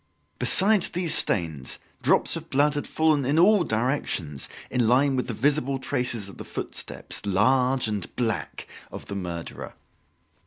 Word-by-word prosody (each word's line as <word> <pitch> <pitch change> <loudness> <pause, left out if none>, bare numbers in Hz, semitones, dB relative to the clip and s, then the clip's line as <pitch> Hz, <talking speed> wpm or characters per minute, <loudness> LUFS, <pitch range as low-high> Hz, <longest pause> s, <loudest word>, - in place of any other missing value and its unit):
Besides 200 0 +3
these 175 -2 0
stains, 80 -8 +1 0.2
drops - - +3
of - - -8
blood 145 +2 +2
had 145 - -4
fallen 155 -3 +1
in 140 +4 0
all 195 +2 +5
directions, 110 - -2 0.2
in 125 -3 +1
line 135 +3 +3
with 125 - -2
the 120 - -3
visible 140 +2 +1
traces 125 -5 -2
of 100 - -12
the - - -6
footsteps - - -2
large 125 +6 +2
and 105 -4 -4
black 115 -3 -3 0.3
of - - -8
the 100 - -7
murderer. 85 -3 -6
125 Hz, 150 wpm, -25 LUFS, 105-145 Hz, 0.3 s, all